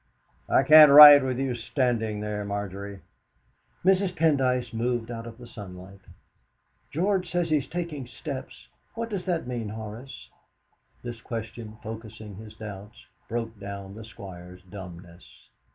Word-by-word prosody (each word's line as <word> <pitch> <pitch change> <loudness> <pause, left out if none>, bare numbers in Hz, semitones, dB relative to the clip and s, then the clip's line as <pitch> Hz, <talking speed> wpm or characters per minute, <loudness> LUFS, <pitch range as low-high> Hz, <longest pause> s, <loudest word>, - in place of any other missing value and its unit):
"I - - +4
can't 155 -1 +9
write 145 -1 +11
with 130 -2 -2
you 135 -1 -1
standing 115 -3 -1
there, 105 -1 -3
Margery!" 100 -1 -5 0.8
Mrs. 190 -1 +3
Pendyce 130 -7 +1
moved 120 0 -2
out 115 0 -6
of 115 -1 -10
the 125 - -12
sunlight. 95 -4 -11 0.9
"George 185 +3 0
says 175 -1 0
he 155 - +3
is 140 - -4
taking 165 -7 -5
steps. 135 +1 -8 0.3
What 230 0 -4
does 195 -3 -4
that 175 -3 -1
mean, 120 -4 -4
Horace?" 110 +4 -9 0.7
This 120 -2 -7
question, 115 -1 -7
focusing 110 -2 -9
his 110 0 -11
doubts, 105 +1 -10 0.2
broke 115 -2 -4
down 100 -1 -8
the 110 +2 -10
Squire's 90 -4 -11
dumbness. 90 -2 -13
115 Hz, 135 wpm, -26 LUFS, 105-135 Hz, 0.9 s, write